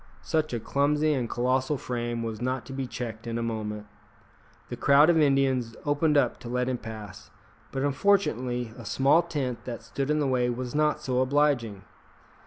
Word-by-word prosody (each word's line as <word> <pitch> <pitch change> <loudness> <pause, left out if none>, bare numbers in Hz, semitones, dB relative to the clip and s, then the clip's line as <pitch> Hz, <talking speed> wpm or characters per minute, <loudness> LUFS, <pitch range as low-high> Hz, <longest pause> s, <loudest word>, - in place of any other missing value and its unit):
Such 155 -1 0
a 120 - -2
clumsy 150 +5 +1
and 125 -5 -2
colossal 130 +4 0
frame 120 -2 -3
was 110 -1 -5
not 130 0 -2
to 135 - -8
be 135 -1 -3
checked 115 -1 -6
in 115 0 -2
a 115 - -2
moment. 105 -2 -4 0.8
The - - -4
crowd 145 +4 +5
of 165 - +3
Indians 135 -5 +2
opened 145 +1 +2
up - - +2
to 120 - -8
let 125 +1 0
him 125 -2 -1
pass, 110 -4 -9 0.4
but 135 0 -2
unfortunately 130 - +1
a - - -8
small 135 +8 +3
tent 145 -8 -3
that 120 -2 -6
stood 135 0 -3
in 150 - +2
the 150 - +1
way 125 -2 +1
was 125 0 -4
not 150 0 +1
so 125 -1 0
obliging. 130 -7 +1
130 Hz, 185 wpm, -27 LUFS, 120-145 Hz, 0.8 s, crowd